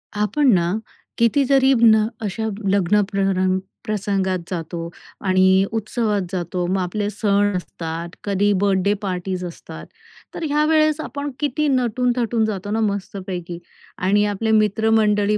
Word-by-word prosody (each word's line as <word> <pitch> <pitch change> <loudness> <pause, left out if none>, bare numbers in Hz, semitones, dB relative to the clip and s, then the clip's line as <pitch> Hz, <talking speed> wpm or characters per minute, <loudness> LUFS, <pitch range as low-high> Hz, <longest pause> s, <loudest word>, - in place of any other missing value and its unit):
आपण 220 +6 +2
ना, 175 -1 +2 0.5
किती 235 +5 +3
तरी 270 -1 +5
ना, 220 -2 +6
अशा 220 +1 -3 0.2
लग्न 200 +1 +3
परंग 190 -1 +1 0.3
प्रसंगात 195 -3 -1
जातो 170 -1 -4 0.4
आणि 190 0 +4
उत्सवात 220 -1 -1
जातो. 180 -1 -2
मग 190 +2 0
आपले 205 +3 -2
सण 205 -1 +1
असतात, 165 -1 -6
कधी 205 0 +1
बर्थडे 200 0 +2
पार्टीज 185 -1 -3
असतात. 170 - -9 0.5
तर - - -5
ह्या 300 +1 +2
वेळेस 310 -1 +3
आपण 285 -1 -5
किती 295 +1 0
नटून-थटून 245 -3 +1
जातो 205 -2 -4
ना, 220 - 0
मस्तपैकी 190 -4 -3 0.4
आणि 205 +3 +3
आपले 210 +2 -1
मित्रमंडळी 215 -1 +2
205 Hz, 130 wpm, -21 LUFS, 185-225 Hz, 0.5 s, ना